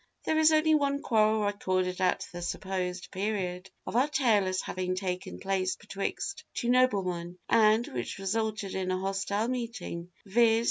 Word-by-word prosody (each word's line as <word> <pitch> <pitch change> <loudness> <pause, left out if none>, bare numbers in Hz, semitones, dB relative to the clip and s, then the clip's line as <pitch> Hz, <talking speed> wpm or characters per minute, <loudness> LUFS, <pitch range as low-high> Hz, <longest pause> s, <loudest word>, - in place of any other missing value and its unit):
There 315 - +1
is 315 0 +6
only 315 0 +4
one 280 -1 +1
quarrel 215 -2 +3
recorded 185 -2 0
at 180 -1 +1
the 175 - -7
supposed 180 0 -3
period 190 -2 -2 0.2
of - - -5
our 255 +4 +4
tale 230 -10 +3
as 185 0 0
having 185 0 -2
taken 185 -1 -4
place 190 -1 0
betwixt 210 +10 -4
two 240 - -1
noblemen, 185 -9 +2
and 220 +1 +5
which 120 -1 -5
resulted 210 0 -2
in 190 -1 -2
a 185 - +1
hostile 195 +3 -1
meeting, 230 -8 -4 0.2
viz. 225 +2 +4
200 Hz, 155 wpm, -29 LUFS, 185-230 Hz, 0.2 s, is